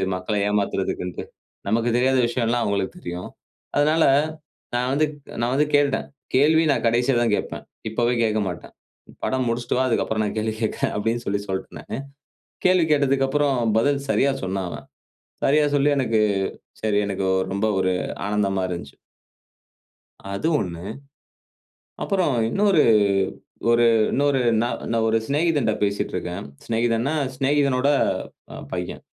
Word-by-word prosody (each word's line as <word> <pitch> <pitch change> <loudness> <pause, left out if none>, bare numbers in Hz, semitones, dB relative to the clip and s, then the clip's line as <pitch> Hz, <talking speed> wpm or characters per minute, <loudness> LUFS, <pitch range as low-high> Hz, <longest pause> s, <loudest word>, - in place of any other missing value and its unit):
மக்கள 90 +4 -3
ஏமாத்துறதுக்குன்டு. 95 -3 -2 0.4
நமக்குத் 115 +3 +1
தெரியாத 130 +2 +3
விஷயம்லாம் 120 0 0
அவுங்களுக்கு 100 -2 -1
தெரியும். 90 +1 -6 0.5
அதனால, 155 +2 +3 0.7
நான் 125 +1 0
வந்து 150 +2 +3 0.4
நான் 120 +2 0
வந்து 150 +2 +2
கேட்டுட்டேன். 145 -1 +2 0.3
கேள்வி 155 +4 +5
நான் 140 - 0
கடைசில 120 +2 +2
தான் 115 -3 +1
கேட்பேன். - - -5 0.3
இப்பவே 120 +2 +1
கேட்க 110 -1 +1
மாட்டேன். 90 - -7 0.5
படம் 130 -1 0
முடிச்சுட்டு 120 +1 -1
வா, 130 - +2
அதுக்கப்புறம் 110 -2 0
நான் 105 - -3
கேள்வி 110 0 -1
கேட்கிறேன் 110 - -1
அப்பிடின்னு 115 +3 -1
சொல்லி 100 +1 0
சொல்லிட்டேன் 95 0 -5
நானு - - -6 0.7
கேள்வி 185 -2 +5
கேட்டதுக்கப்புறம் 140 -1 +2 0.2
பதில் 140 +3 +1
சரியா 140 0 +3
சொன்னான் 95 0 -2
அவன். - - -9 0.6
சரியா 150 +2 +4
சொல்லி 145 +1 +3
எனக்கு 115 -4 +1 0.6
சரி 105 -2 +2
எனக்கு 95 -1 -2 0.3
ரொம்ப 100 +2 0
ஒரு 95 0 +1 0.3
ஆனந்தமா 100 -2 0
இருந்துச்சு. 85 -6 -6 1.4
அது 100 +11 -1
ஒண்ணு. 85 -3 -4 1.2
அப்பறம் 185 -8 +1 0.2
இன்னொரு 195 - +3 0.9
ஒரு 120 0 +5 0.3
இன்னொரு 140 -1 +2 0.2
ந - - +1 0.3
நான் 115 -1 +1
ஒரு 110 0 +3
சிநேகிதன்ட்ட 145 -6 +1
பேசிட்டு 100 0 -1
இருக்கேன். 90 +3 -4 0.2
சிநேகிதன்னா, 115 +4 0 0.2
சிநேகிதனோட 140 0 +2 0.6
அ - - -8 0.2
பையன். 90 -1 -4
120 Hz, 130 wpm, -23 LUFS, 105-140 Hz, 1.4 s, கேள்வி